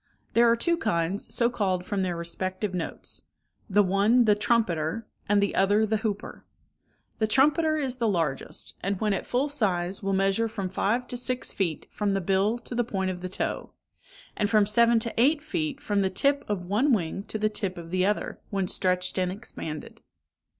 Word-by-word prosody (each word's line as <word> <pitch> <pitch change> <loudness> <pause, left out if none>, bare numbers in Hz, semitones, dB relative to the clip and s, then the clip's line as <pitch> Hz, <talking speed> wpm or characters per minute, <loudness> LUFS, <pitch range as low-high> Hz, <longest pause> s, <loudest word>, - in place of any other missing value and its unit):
There 235 0 +5
are 230 - +5
two 340 +8 +1
kinds, 195 - -1
so 235 - +4
called 190 -7 -1
from 200 -1 -1
their 180 -2 -1
respective 185 +4 -3
notes—the 190 +3 -3
one 205 +6 +3
the 210 - +5
trumpeter, 205 -3 0 0.2
and 205 -1 +4
the 200 - 0
other 205 +3 +3
the 220 +1 +1
hooper; 210 -2 -4 0.8
the 220 - +2
trumpeter 300 +6 +3
is 265 -4 -1
the 235 -2 +1
largest, 165 -9 -2
and 195 0 -2
when 210 -2 +1
at 190 - -3
full 255 +4 +1
size 195 -9 0
will 195 -1 -1
measure 195 +4 +2
from 200 -4 -4
five 225 +6 0
to 245 - -2
six 250 +1 0
feet 170 -6 -2
from 205 -2 -1
the - - +1
bill 195 +5 +1
to 240 - -8
the 240 0 +1
point 190 -4 -2
of 180 -1 -7
the 185 - -4
toe, - - -3 0.6
and 205 -2 0
from 210 -1 +4
seven 235 +3 +4
to 230 - -1
eight 290 +3 +3
feet 310 -3 -2
from 205 -8 0
the 190 - +1
tip 280 +9 +1
of 195 -4 -2
one 240 +9 +2
wing 185 -2 -1
to - - -4
the 215 0 +1
tip 200 -3 -3
of 170 -1 -9
the 185 0 +1
other, 210 +2 -1
when 195 -3 -1
stretched 180 +1 0
and 180 -1 0
expanded. 165 -7 -6
205 Hz, 190 wpm, -27 LUFS, 185-235 Hz, 0.8 s, There